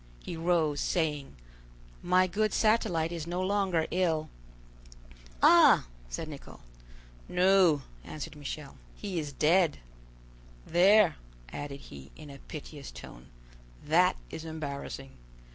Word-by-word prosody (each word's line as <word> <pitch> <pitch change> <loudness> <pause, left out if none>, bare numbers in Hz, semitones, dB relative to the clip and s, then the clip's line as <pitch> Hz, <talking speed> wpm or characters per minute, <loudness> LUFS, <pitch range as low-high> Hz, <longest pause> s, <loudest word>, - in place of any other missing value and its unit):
He - - -6
rose, 160 -3 +1
saying: 150 - -1 0.7
"My 180 +1 +3
good 210 +3 -1
Satellite 215 -7 +2
is 170 -2 -5
no 175 +1 -3
longer 185 -4 +1
ill." 165 -4 0 1.1
"Ah!" - - +7 0.2
said - - -5
Nicholl. - - -11 0.7
"No," 180 -5 +4 0.2
answered 150 - -7
Michel, 145 0 -7 0.2
"he 195 -5 -4
is 150 -2 -5
dead! 165 +3 +3 0.9
There," 190 +3 +5 0.4
added 140 -1 -6
he, 70 0 -12
in 150 -2 -11
a 140 - -12
piteous 145 -1 -9
tone, 65 +2 -12 0.6
"that - - +4 0.2
is 160 - -6
embarrassing. 140 -4 -6
160 Hz, 110 wpm, -29 LUFS, 145-185 Hz, 1.1 s, Ah